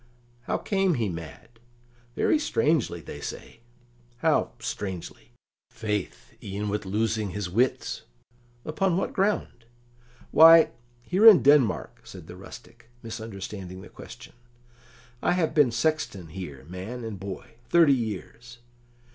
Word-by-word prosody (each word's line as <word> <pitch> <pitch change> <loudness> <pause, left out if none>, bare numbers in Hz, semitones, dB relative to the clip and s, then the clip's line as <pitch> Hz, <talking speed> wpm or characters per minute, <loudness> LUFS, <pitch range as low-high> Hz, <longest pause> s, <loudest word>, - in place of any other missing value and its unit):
"How - - 0
came 195 -4 +1
he 115 -5 -1
mad?" 85 - -9 0.6
"Very 310 - +2
strangely, 150 - 0
they - - -9
say." - - -8 0.6
"How 160 +4 +2
'strangely'?" 100 -7 -6 0.4
"Faith, 105 - -4
e'en 100 +1 -4
with 105 -1 -3
losing 110 +1 -1
his 95 -1 -5
wits." 125 +7 0 0.6
"Upon 175 +3 0
what 195 - -2
ground?" 190 - -1 0.7
"Why, 160 0 +8 0.3
here 190 - +4
in 210 -5 +9
Denmark," 135 - +3
said - - -11
the - - -10
rustic, 115 - -13
misunderstanding 100 -4 -7
the - - -12
question. - - -12 0.9
"I - - +2
have 175 -3 0
been 145 -5 +5
sexton 115 - -1
here, 75 -7 -8
man 95 +8 -7
and 110 -4 -6
boy, 100 +4 -8
thirty 165 -5 +6
years." 120 +1 -5
115 Hz, 120 wpm, -26 LUFS, 95-155 Hz, 0.9 s, in